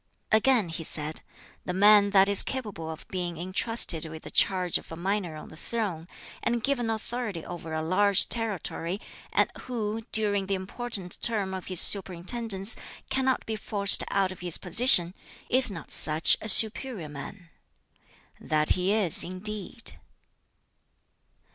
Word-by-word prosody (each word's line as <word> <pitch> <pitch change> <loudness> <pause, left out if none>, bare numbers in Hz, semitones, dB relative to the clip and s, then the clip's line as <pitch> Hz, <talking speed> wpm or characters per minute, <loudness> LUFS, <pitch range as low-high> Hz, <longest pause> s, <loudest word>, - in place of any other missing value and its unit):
Again 220 -3 +1
he 165 0 -7
said: 155 0 -5 0.4
"The 180 - -5
man 205 +1 +4
that 195 -1 +3
is 200 -1 +6
capable 210 -11 -7
of 160 0 -11
being 175 -3 -6
intrusted 185 -1 +2
with 160 0 -12
the - - -10
charge 185 -3 0
of - - -18
a - - -7
minor 185 -1 -4
on 155 - -12
the - - -14
throne, 180 -3 -6 0.3
and 235 -1 -3
given 245 -4 -2
authority 220 -5 -6
over 175 -2 -10
a 160 0 -4
large 195 +4 +1
territory, 200 -5 -4 0.3
and - - 0
who, 225 -3 -6
during 205 -3 0
the 195 - -2
important 190 0 -7
term 205 -5 -3
of 190 -1 -8
his 185 -2 -1
superintendence 195 +2 +1 0.4
cannot 265 -1 -2
be 220 - -5
forced 200 -1 +1
out 195 -1 -1
of 185 - -12
his 175 -2 0
position, 180 -2 +5 0.4
is 255 0 +7
not 170 -6 -9
such 155 +1 +4
a 220 - 0
'superior 220 -3 +6
man'? 165 +5 -11 0.9
That 155 0 +1
he 185 +2 -1
is, 205 -6 +6
indeed." 210 +5 -2
195 Hz, 150 wpm, -25 LUFS, 175-220 Hz, 0.9 s, is